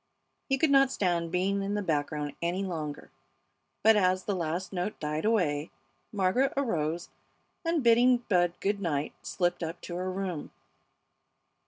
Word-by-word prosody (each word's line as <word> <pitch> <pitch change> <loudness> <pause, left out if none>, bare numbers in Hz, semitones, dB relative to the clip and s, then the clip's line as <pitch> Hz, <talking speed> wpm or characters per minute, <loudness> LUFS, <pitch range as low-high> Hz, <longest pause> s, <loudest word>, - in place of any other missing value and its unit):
He 270 - +3
could 295 +1 +3
not 275 -1 +5
stand 175 -6 0
being 195 +2 +1
in 200 +1 -2
the 205 - -1
background 150 -3 -1
any 175 +3 -1
longer; 155 -5 -5 0.7
but 220 0 +7
as 185 -2 +2
the 200 - -1
last 175 +3 -3
note 180 +3 -3
died 150 +2 -2
away 165 -9 +1 0.4
Margaret 210 +7 +2
arose 170 - -1 0.5
and, 330 -4 0
bidding 240 +2 +6
Bud 175 -4 +3
good 200 0 0
night, 150 -5 -1
slipped 175 -1 -1
up 165 +1 -4
to 175 - -6
her 185 +1 -2
room. 185 -5 -4
185 Hz, 150 wpm, -29 LUFS, 165-210 Hz, 0.7 s, but